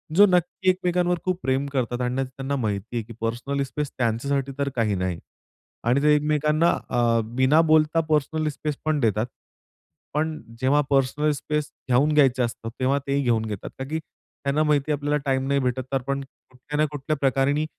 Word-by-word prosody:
जो 205 +3 +8
नक्की 180 0 +1
एकमेकांवर 180 -1 +1
खूप 185 -1 0
प्रेम 135 +1 +1
करतात 125 -1 -1
आणि 125 +2 0
त्यांना 135 +2 -4
माहिती 110 -2 -3
आहे 115 - -1
की 115 - -10
पर्सनल 120 +5 -1
स्पेस 145 +1 -4
त्यांच्यासाठी 135 +4 0
तर 140 0 0
काही 110 -4 +1
नाही 90 -2 -2 0.7
आणि 125 +4 +3
ते 150 0 +6
एकमेकांना 150 +2 +2 0.2
अ, 120 -2 +2
बिना 130 +7 +3
बोलता 155 0 +3
पर्सनल 155 +1 +1
स्पेस 150 0 -4
पण 155 -2 +1
देतात. 110 -2 +1 0.9
पण 155 +2 +1 0.3
जेव्हा 140 +3 +3
पर्सनल 140 +2 +2
स्पेस 150 +1 -2 0.2
घेऊन 140 +5 +3
घ्यायचं 130 -4 +4
असतं, 115 -1 -6
तेव्हा 135 +2 +2
ते 140 - 0
ही 140 - +2
घेऊन 115 -2 +1
घेतात. 105 -3 -5
का 130 - -2
की 160 - -1
त्यांना 145 -1 -4
माहिती 150 -1 +1
आहे 145 - +1
आपल्याला 145 +1 0
टाईम 135 -1 0
नाही 140 0 +2
भेटत 125 0 -1
तर - - +4
आपण 140 +2 -3 0.3
कुठल्या 130 +4 -7
ना 155 - +4
कुठल्या 145 +1 -2
प्रकाराने 140 +2 +1
140 Hz, 180 wpm, -24 LUFS, 125-150 Hz, 0.9 s, जो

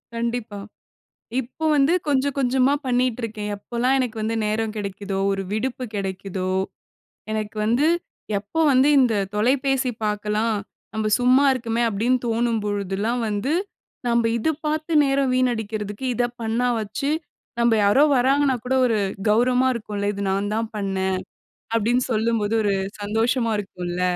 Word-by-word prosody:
கண்டிப்பா. 230 -3 -3 0.8
இப்போ 265 +6 -7
வந்து 280 +4 +4
கொஞ்சம் 280 -1 +1
கொஞ்சமா 260 +1 +3
பண்ணீட்டுருக்கேன். 235 -4 -1
எப்போலாம் 240 +5 0
எனக்கு 245 -3 -2
வந்து 220 +1 -1
நேரம் 215 +1 -1
கெடைக்குதோ, 200 -1 -4
ஒரு 195 0 -1
விடுப்பு 250 +3 -2
கெடைக்குதோ, 190 -1 -3 0.8
எனக்கு 215 0 -3
வந்து 240 +8 +2 0.5
எப்போ 210 +11 -3
வந்து, 260 +3 +5
"இந்த 245 -4 +4 0.2
தொலைபேசி 260 +3 +1
பாக்கலாம். 210 +1 0 0.4
நம்ம 215 -1 -1
சும்மா 255 +3 +4
இருக்கமே." 235 -2 -1
அப்டீன்னு 235 +5 +1
தோணும் 230 -1 +1
பொழுதெல்லாம் 205 +4 -1
வந்து, 210 +8 -1 0.6
நம்ப 235 -1 +2
இத 230 - 0 0.2
பார்த்து 310 +2 -2
நேரம் 270 -1 +1
வீணடிக்கிறதுக்கு, 220 -2 -1
இத 245 - +2 0.2
பண்ணா 230 +3 0
வாச்சு 220 +7 -2 0.5
நம்ப 235 -1 +4
யாரோ 205 +8 +5
வராங்கன்னா 270 +1 +3
கூட 260 +1 0
ஒரு 225 -3 +1 0.3
கௌரவமா 250 +3 +3
இருக்கும்ல்ல, 205 -3 -4
"இது 200 - -4
நான் 200 +2 -1
தான் 225 0 -1
பண்ணேன்." 190 -2 -1 0.6
அப்படீன்னு 240 +3 +2
சொல்லும்போது 220 -1 +1
ஒரு 200 -1 +2 0.3
சந்தோஷமா 230 +3 +1
இருக்கும்ல்ல. 180 -2 -4
230 Hz, 130 wpm, -23 LUFS, 210-255 Hz, 0.8 s, வந்து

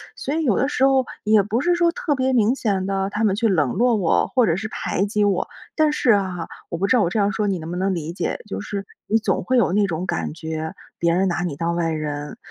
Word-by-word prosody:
所 280 - -4
以 325 - 0
有 235 -9 +2
的 270 - +2
时 265 - 0
候 265 -1 +3 0.2
也 215 -1 +5
不 215 +4 -1
是 350 +5 +2
说 345 -1 +3
特 320 -3 -1
别 260 0 +1
明 230 -1 +3
显 200 -7 -1
地 195 0 -1
他 210 +3 -1
们 200 -3 +3
去 225 +2 +1
冷 150 - +2
落 240 0 +3
我 190 -6 +2
或 250 -3 +2
者 165 - +2
是 205 +4 -3
排 195 -2 -1
挤 210 0 0
我。 190 -3 +1 0.3
但 310 -1 +3
是 240 -7 +3
哈， 185 -4 -3 0.2
我 170 - -3
不 190 - 0
知 255 - +3
道 - - +4
我 170 - +1
这 220 - 0
样 200 0 +2
说 210 +1 -1
你 195 -2 0
能 160 0 -7
不 180 - -3
能 190 +1 0
理 165 0 -4
解， 175 - -3
就 95 0 -4
是 200 - -5 0.2
你 220 - +3
总 220 - -1
会 255 - +1
有 230 -7 +3
那 205 0 +3
种 175 0 -3
感 - - -2
觉， 160 0 -4 0.3
别 170 0 +2
人 190 +2 +2
拿 175 -1 -1
你 170 -5 -3
当 170 +3 -1
外 170 -1 0
人。 150 +2 -4
195 Hz, 295 characters per minute, -22 LUFS, 170-230 Hz, 0.3 s, 也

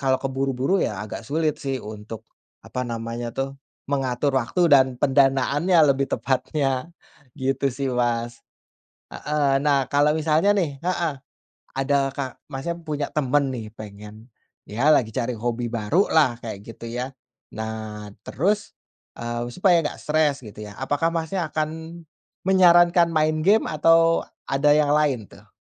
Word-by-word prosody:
kalau 130 -1 +2
terburu-buru 135 +6 -1
ya - - -1
agak 110 +1 -8
sulit 155 0 0
sih 135 -1 -2
untuk, 105 0 -9 0.4
apa 125 -1 -4
namanya 115 +1 -4
tuh, 135 0 -2 0.3
mengatur 135 0 -1
waktu 125 +9 -3
dan 135 -2 +7
pendanaannya 140 +6 +2 0.2
lebih 135 0 -2
tepatnya, 135 +1 -1 0.5
gitu 135 0 0
sih, 135 +1 -3
Mas. 120 -1 -1 0.7
Heeh, 145 -2 0
nah 140 -3 +2
kalau 145 +1 +3
misalnya 160 +5 +3
nih, 160 -9 -1
heeh, 175 -3 0 0.6
ada 135 +1 +1 0.2
ka 130 -2 -5 0.2
Mas 135 +4 -5 0.2
punya 150 -2 -3
temen 140 -1 +1
nih 110 -4 -7
pengen 105 +1 -11 0.4
ya 120 +8 0
lagi 120 -7 +2
cari 125 -2 -1
hobi 120 +1 -2
baru 115 - +1
lah 145 -7 +4
kayak 110 -3 -5
gitu 115 +1 -9
ya. 125 +3 -4 0.4
Nah 110 -1 -6 0.2
terus, 205 +8 -1 0.4
eee, 120 0 -4
supaya 180 -2 +4
nggak - - -4
stres 150 -3 +1
gitu 105 -2 -10
ya, 105 - -9
apakah 145 +4 0
Masnya 165 +2 -1
akan 160 +2 -4 0.4
menyarankan 175 -2 +5
main 155 0 +2
game 215 +3 +4
atau 165 +2 +4 0.2
ada 140 +2 +3
yang 150 -1 +3
lain 140 -8 +1
tuh? 100 - -17
135 Hz, 140 wpm, -23 LUFS, 120-155 Hz, 0.7 s, dan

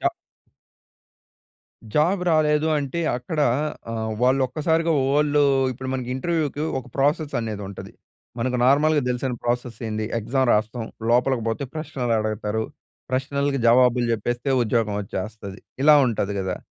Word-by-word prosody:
చ - - 0 1.9
జాబ్ 180 +6 +3
రాలేదు 155 -1 +3
అంటే 145 +3 -2 0.2
అక్కడ 150 +5 -4 0.5
ఆహ్, 110 -1 -3
వాళ్ళు 130 +2 +3
ఒక్కసారిగా 160 +5 0 0.2
వోళ్ళు 145 +1 +3 0.3
ఇప్పుడు 130 +2 -7
మన 130 -2 -3
ఇంటర్వ్యూకి 150 0 -1 0.2
ఒక 130 - -8
ప్రాసెస్ 145 +2 +1
అనేది 110 -3 -4
ఉంటది. 100 - -9 0.5
మనకు 125 +2 0
నార్మల్గా 145 +2 +4
తెలిసిన 125 +1 -2
ప్రాసెస్సేంది 115 -3 -2
ఎగ్జామ్ 130 +3 0
రాస్తాం. 110 +2 -1 0.2
లోపలికి 125 -1 +2
పోతే 115 +5 -2
ప్రశ్నలు 130 -7 -2
అడగతారు. 110 0 -2 0.5
ప్రశ్నలకు 140 +1 -1
జవాబులు 125 0 +4
చెప్పేస్తే 120 +4 -2
ఉద్యోగం 110 -2 0
వచ్చేస్తది. 100 0 -6 0.2
ఇలా 150 0 +7
ఉంటది 105 -3 -1
గదా! 95 -1 -2
125 Hz, 120 wpm, -23 LUFS, 115-145 Hz, 1.9 s, ఇలా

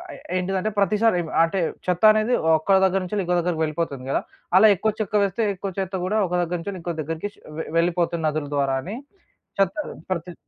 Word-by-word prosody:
ఏ - - -11 0.2
ఏంటిదంటే 190 +3 -1
ప్రతిసారి 210 +1 +3 0.3
అంటే 185 +3 0 0.3
చెత్త 180 +2 -1
అనేది 215 +3 +1 0.2
ఒక్క 190 +5 +3
దగ్గర 190 0 +3
నుంచి 185 +3 -4
ఇంకో 180 0 0
దగ్గరికి 170 -2 -1
వెళ్ళిపోతుంది 155 -4 -3
గదా! - - +1 0.3
అలా 215 +3 +8
ఎక్కువ 215 +4 0
చెత్త 210 0 -2
వేస్తే 200 +4 -1
ఎక్కువ 195 +1 -5
చెత్త 190 0 -3
కూడా 215 +4 0
ఒక - - -12
దగ్గర 175 +1 -1
నుంచి 200 +2 -5
ఇంకో 170 0 -3
దగ్గరికి 165 +6 -4
ష్ - - -26 0.2
వె - - -3
వెళ్ళిపోతుంది 170 -1 +1
నదుల 150 -1 -2
ద్వారా 135 -1 +1
అని 200 - -6 0.6
చెత్త 195 -2 +2 0.4
ప్రతి 175 0 -3
180 Hz, 190 wpm, -23 LUFS, 165-200 Hz, 0.6 s, అలా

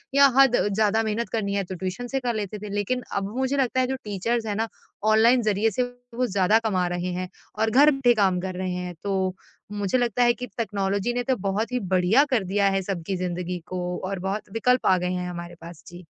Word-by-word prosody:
या 280 0 +8
हद 270 -3 +6 0.2
ज़्यादा 220 +1 +2
मेहनत 220 +2 -2
करनी 200 -3 -2
है 200 - 0
तो 185 +1 -7
ट्यूशन 190 +7 -4
से 270 +2 -1
कर 245 -2 -1
लेते 210 0 -4
थे। 210 0 -7
लेकिन 250 +5 -1
अब 200 +2 -2
मुझे 265 +2 0
लगता 260 -1 +1
है 255 - +1
जो 265 - -1
टीचर्स 220 +3 -1
हैं 205 -1 -2
ना 225 +1 0 0.5
ऑनलाइन 235 +3 +5
ज़रिए 215 +1 +2
से 250 +6 0 0.3
वो 250 +1 +1
ज़्यादा 200 +2 +3
कमा 185 -4 +1
रहे 175 +1 -3
हैं 185 0 -3 0.3
और 220 - +2
घर 285 +6 +6
बैठे 265 -3 +3
काम 190 -3 +2
कर 185 -1 -4
रहे 185 0 -3
हैं। 180 0 -4
तो 190 -2 0 0.4
मुझे 205 +4 0
लगता 245 0 +1
है 240 0 +5
कि 250 - -6
टेक्नोलॉज़ी 200 0 -1
ने 245 0 -1
तो 260 0 +1
बहुत 220 +5 -1
ही 250 - 0
बढ़िया 190 +6 +3
कर 235 -7 +2
दिया 200 +2 +1
है 195 0 0
सबकी 190 -1 -3
ज़िंदगी 180 0 -3
को 185 -1 -4 0.3
और 195 -2 -3
बहुत 195 +2 -3
विकल्प 250 +3 +2
आ 185 - +5
गए 180 0 -2
हैं 180 0 -3
हमारे 175 0 -7
पास। 170 -1 -11
जी। 175 +1 -10
205 Hz, 230 wpm, -25 LUFS, 185-240 Hz, 0.5 s, या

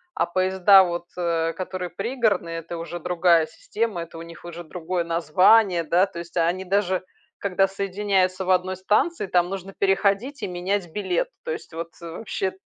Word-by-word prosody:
А - - +1
поезда, 190 +2 +5
вот, 175 -1 -3
э, 165 -2 0
которые 185 0 -5
пригородные, 200 -5 -1
это 165 +1 -7
уже 170 +1 -6
другая 170 -1 +3
система, 230 - -3
это 165 0 -12
у - - -7
них 170 0 -11
уже 175 0 -7
другое 175 +1 -3
название, 175 +3 +4
да, 175 +4 +3
то 170 -3 -9
есть 170 +1 -8
они 175 +3 +1
даже, 190 -1 +1 0.4
когда 195 -1 +2
соединяются 195 -1 0
в 185 - +1
1 185 +1 +2
станции, 210 - +1
там 180 -1 +2
нужно 195 0 -6
переходить 200 +7 +1
и 200 - -1
менять 180 0 -2
билет. 210 - -1
То 485 - -4
есть 425 - -7
вот, 165 0 -5
э, 170 -1 -7
вообще 190 0 -3
185 Hz, 175 wpm, -24 LUFS, 170-195 Hz, 0.4 s, поезда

